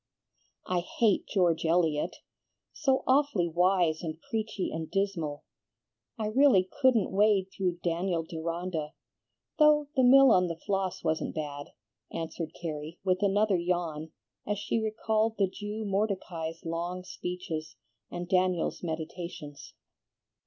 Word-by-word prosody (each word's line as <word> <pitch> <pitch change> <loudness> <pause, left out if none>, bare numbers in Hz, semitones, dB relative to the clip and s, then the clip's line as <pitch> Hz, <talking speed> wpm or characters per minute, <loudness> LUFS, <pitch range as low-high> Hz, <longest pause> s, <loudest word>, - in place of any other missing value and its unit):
"I 180 -1 0
hate 200 +3 +1
George 175 -4 +2
Eliot, 165 -2 +1 0.6
so 270 -4 +1
awfully 260 -10 +3
wise 175 -1 +2
and 160 -2 -5
preachy 215 0 -3
and 160 -1 -4
dismal! 175 -7 -2 0.7
I 220 - -2
really 215 -4 +4
couldn't 255 -6 +4
wade 200 -1 +3
through 180 -2 -1
'Daniel 170 0 0
Deronda,' 165 -1 -4 0.7
though 300 -1 +5
'The 260 - +4
Mill 265 +1 +7
on 180 -3 +4
the 165 -1 -4
Floss' 195 -2 -1
wasn't 160 -1 -1
bad," 145 -2 -4 0.4
answered 165 0 -5
Carrie, 160 -1 -5
with 185 0 +1
another 205 0 +3
yawn, 170 -3 -2 0.4
as 210 0 0
she 215 +3 -1
recalled 220 0 0
the 200 - +4
Jew 210 +3 -5
Mordecai's 190 -5 -2
long 170 +2 -3
speeches, 180 -4 -5 0.3
and 175 0 -5
Daniel's 185 -2 +1
meditations. 160 -2 -6
180 Hz, 125 wpm, -29 LUFS, 165-205 Hz, 0.7 s, Mill